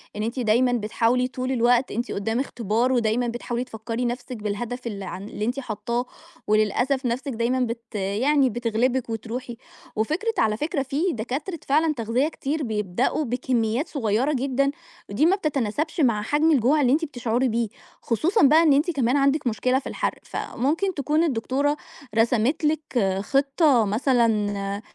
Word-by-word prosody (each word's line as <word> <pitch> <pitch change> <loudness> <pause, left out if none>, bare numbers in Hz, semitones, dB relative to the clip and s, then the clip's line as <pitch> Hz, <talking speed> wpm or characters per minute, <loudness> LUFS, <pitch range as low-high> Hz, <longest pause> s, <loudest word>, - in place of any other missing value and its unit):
إن 210 - -2
أنتِ 235 +4 -3
دايمًا 245 +2 +3
بتحاولي 235 +2 +1
طول 255 0 -4
الوقت 245 0 +2
أنتِ 240 +3 -3
قدام 225 +4 -1
اختبار 235 -1 0
ودايمًا 240 0 +1
بتحاولي 240 +1 -3
تفكري 230 0 -4
نفسِك 245 +1 -4
بالهدف 230 +4 -4
ال 200 -3 -5
ع 185 - -5
اللي 205 +2 -5
أنتِ 245 +4 -1
حاطاه، 235 0 -3 0.4
وللأسف 230 +6 +1
نفسِك 255 +4 -2
دايمًا 235 +3 0
بت 230 -2 -4
يعني 250 +8 +2
بتغلبِك 240 +2 0
وتروحي، 235 +2 -5 0.4
وفكرة 320 - 0
على 215 -1 +2
فكرة 295 0 -1
في 275 +3 -3
دكاترة 270 - -4
فعلًا 305 +3 +3
تغذية 240 +2 0
كتير 305 -1 -3
بيبدأوا 215 +5 -1
بكميات 245 +1 0
صغيرة 250 +1 0
جدًا، 275 +1 +1 0.4
ودي 205 +10 +2
ما 365 +4 +4
بتتناسبش 300 - -2
مع 230 -6 +3
حجم 295 +9 +2
الجوع 285 +2 +3
اللي 255 -3 +3
أنتِ 320 +3 +1
بتشعري 245 -2 -1
بيه، 230 0 0 0.3
خصوصًا 330 - +1
بقى 310 +4 +6
إن 305 -4 +5
أنتِ 300 +6 +2
كمان 265 -3 +1
عندِك 275 0 +2
مشكلة 250 +4 +1
في - - -9
الحرق، - - -3
فممكن 325 +10 -1
تكون 300 +2 +1
الدكتورة 280 +1 0 0.4
رسمِت 235 +7 +2
لِك 250 -11 0
خطة 275 - +3
مثلًا 210 -3 +1
245 Hz, 155 wpm, -24 LUFS, 225-280 Hz, 0.4 s, بقى